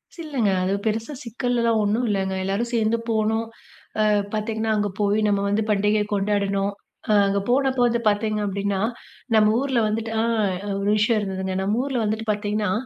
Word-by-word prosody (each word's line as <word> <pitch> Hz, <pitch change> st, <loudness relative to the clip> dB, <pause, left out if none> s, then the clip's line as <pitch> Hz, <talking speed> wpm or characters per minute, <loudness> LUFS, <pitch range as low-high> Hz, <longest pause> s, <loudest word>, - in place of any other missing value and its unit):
சில்லைங்க. 280 Hz, -, -1 dB
அது 190 Hz, +1 st, 0 dB
பெருசா 225 Hz, +6 st, -1 dB
சிக்கல்லலாம் 235 Hz, -1 st, 0 dB
ஒண்ணும் 220 Hz, +4 st, +1 dB
இல்லங்க. 190 Hz, -2 st, 0 dB
எல்லாரும் 200 Hz, +5 st, -1 dB
சேர்ந்து 225 Hz, 0 st, +2 dB
போனோம், 220 Hz, 0 st, +1 dB, 0.5 s
அ -, -, +4 dB, 0.3 s
பார்த்தீங்கன்னா 220 Hz, +1 st, -1 dB
அங்கே 205 Hz, -1 st, 0 dB
போய் 205 Hz, +1 st, +2 dB
நம்ம 200 Hz, -1 st, +2 dB
வந்து 210 Hz, +2 st, +1 dB
பண்டிகையை 210 Hz, +1 st, +2 dB
கொண்டாடணும். 200 Hz, 0 st, 0 dB, 0.4 s
அ -, -, +3 dB, 0.2 s
அங்க 200 Hz, 0 st, +1 dB
போன 270 Hz, +2 st, +3 dB
போது 240 Hz, -1 st, +3 dB
பார்த்தீங்க 215 Hz, +1 st, 0 dB
அப்டின்னா, 200 Hz, 0 st, -1 dB, 0.6 s
நம்ம 215 Hz, 0 st, +5 dB
ஊருல 265 Hz, -2 st, 0 dB
வந்துட்டு 220 Hz, +1 st, -2 dB
அ -, -, +1 dB, 0.6 s
ஒரு 200 Hz, +1 st, 0 dB
விஷயம் 215 Hz, +1 st, +2 dB
இருந்ததுங்க. 190 Hz, -1 st, -3 dB
நம்ம 205 Hz, +4 st, 0 dB
ஊருல 270 Hz, -3 st, -2 dB
வந்துட்டு 220 Hz, +1 st, -2 dB
பார்த்தீங்கன்னா, 210 Hz, -1 st, -1 dB
215 Hz, 160 wpm, -23 LUFS, 200-230 Hz, 0.6 s, நம்ம